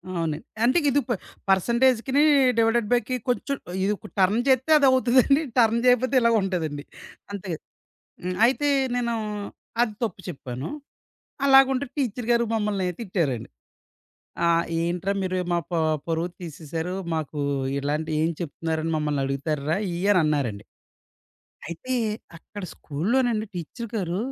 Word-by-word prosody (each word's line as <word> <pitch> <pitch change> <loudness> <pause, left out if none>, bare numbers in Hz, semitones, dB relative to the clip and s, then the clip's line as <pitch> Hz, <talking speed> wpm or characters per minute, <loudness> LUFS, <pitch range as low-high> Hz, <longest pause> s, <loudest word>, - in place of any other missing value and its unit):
అవునండి. 160 -3 -1 0.2
అంటే 250 +7 +4
ఇది 280 +1 +3
ప - - +1 0.4
పర్సెంటేజికిని, 240 +7 +3 0.4
డివైడెడ్ 225 -1 +3
బైకి 245 +1 +1
కొంచెం, 275 +3 -1 0.3
ఇది 205 +2 +2 0.3
టర్న్ 195 +5 +4
జేత్తే 265 +3 +3
అదవుతుందండి. 260 +1 +4 0.2
టర్న్ 230 -1 +4
జేయకపోతే 250 +2 +3
ఇలాగుంటదండి. 185 -10 +1 0.5
అంతేగ. 190 -5 -4 0.7
హ్మ్. 180 0 -2
అయితే 280 +4 +2 0.3
నేను, 240 -1 0 0.7
అది 220 -3 +1
తప్పు 195 -4 -3
చెప్పాను. 130 -3 -6 0.8
అలాగుంటే 270 0 +5
టీచరు 245 -4 -2
గారు 235 0 +4
మమ్మల్ని 210 -3 0
తిట్టారండి. 170 - -2 1.0
ఆహ్, 170 0 +3 0.2
ఏంట్రా 175 +3 -1
మీరు 185 0 -1
మా 175 - +2
ప - - -11 0.4
పరువు 165 +1 0
తీసేసారు, 165 +2 -5 0.2
మాకు 155 -1 -3 0.4
ఇలాంటివి 150 +3 -1
ఏం 165 - +2
చెప్తున్నారని 160 0 -3
మమ్మల్ని 150 -2 -1
అడుగుతార్రా? 145 +3 -1 0.2
ఇయ్యని 190 +2 +3
అన్నారండి 130 -9 -1 1.0
అయితే 170 +10 -5 0.4
అక్కడ 205 +4 -10
స్కూలు‌లోనండి 220 - 0
టీచర్ 180 +8 -6
గారు, 180 -2 -2
190 Hz, 115 wpm, -25 LUFS, 160-240 Hz, 1.0 s, అలాగుంటే